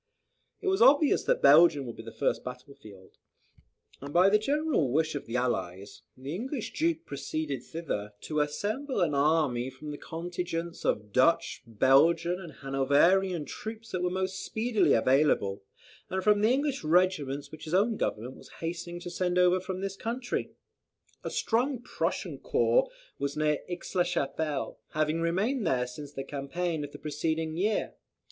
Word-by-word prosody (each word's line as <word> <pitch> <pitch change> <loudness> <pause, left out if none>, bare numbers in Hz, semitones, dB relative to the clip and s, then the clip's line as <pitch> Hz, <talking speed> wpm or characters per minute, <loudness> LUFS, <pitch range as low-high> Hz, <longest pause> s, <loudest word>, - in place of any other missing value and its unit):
It 405 - -5
was 385 0 +2
obvious 285 +2 +5
that - - +1
Belgium 145 0 +6
would 120 - -7
be - - -8
the 115 0 -9
first - - -1
battle 125 +2 -8
field; 105 -9 -16 0.8
and 140 +1 -7
by 180 +4 +5
the 210 +1 +4
general 280 - +1
wish 155 +3 +1
of 145 - -5
the 115 - -5
Allies, 100 -6 -2 0.2
the 135 +3 -6
English 245 - -4
Duke 325 0 0
proceeded 140 -1 -4
thither 115 -10 -5
to 155 -1 -2
assemble 205 - -1
an 160 -4 +2
army 140 -4 +2
from 130 +3 -9
the 145 - -7
contingents 170 0 -5
of 105 -1 -1
Dutch, 150 +6 +2
Belgian, 160 - +3
and 170 -4 -9
Hanoverian 145 +6 +2
troops, 220 +9 -8
that 185 - -2
were 180 - +1
most 190 +1 -2
speedily 220 0 +1
available, 120 -6 +2 0.5
and 190 0 -2
from 210 0 +4
the 215 - +4
English 275 - 0
regiments 155 -4 +1
which 155 - -10
his 160 +3 -1
own 215 +4 +3
Government 120 - -3
was - - -15
hastening 170 +1 -4
to 175 - -6
send 180 0 -1
over 180 0 +4
from 185 0 -5
this 195 0 -3
country. 245 +3 -3 0.7
A - - -3
strong 250 +3 0
Prussian 245 - -3
corps - - +2 0.3
was 140 +1 -2
near 150 -1 +1
Aix 175 -1 -6
la 185 - +3
Chapelle, 155 -3 -2
having 155 +2 0
remained 200 +9 0
there 125 -1 +1
since 140 +4 -9
the 135 - -5
campaign 150 +4 -3
of 145 - -7
the - - -9
preceding 160 +1 -2
year. 205 +5 0
165 Hz, 165 wpm, -29 LUFS, 140-190 Hz, 0.8 s, Belgium